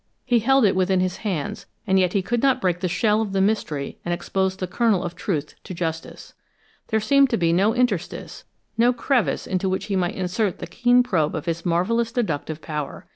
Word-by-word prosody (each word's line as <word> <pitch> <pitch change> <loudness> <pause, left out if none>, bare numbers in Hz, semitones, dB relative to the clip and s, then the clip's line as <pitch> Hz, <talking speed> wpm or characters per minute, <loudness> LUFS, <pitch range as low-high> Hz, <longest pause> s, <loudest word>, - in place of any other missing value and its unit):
He 240 -1 +3
held 270 +2 +4
it 195 - +3
within 185 0 +2
his 185 0 -1
hands, 205 0 -4 0.2
and 190 -2 +3
yet 180 -1 +2
he 195 - +1
could 240 +4 -1
not 270 -2 +3
break 180 -2 0
the 185 - -1
shell 215 +4 +2
of 205 -3 -3
the 195 - +1
mystery 190 -9 -1
and 175 - -3
expose 190 +2 -1
the 185 - -3
kernel 195 0 +1
of 175 -1 -5
truth 155 -5 -3
to 185 - -7
justice. 165 -1 -5 0.5
There 220 - +1
seemed 275 +5 +4
to 230 - +1
be 170 -2 +2
no 195 +5 +3
interstice, 240 -8 -2 0.4
no 240 +2 +5
crevice 240 - 0
into 190 0 -1
which 185 - -2
he 200 - -2
might 180 -2 0
insert 190 +2 -1
the - - -6
keen 245 +1 +3
probe 165 -11 0
of 155 - -4
his 170 0 -3
marvelous 225 +7 +1
deductive 160 - -3
power. 150 -2 -5
190 Hz, 210 wpm, -23 LUFS, 175-225 Hz, 0.5 s, no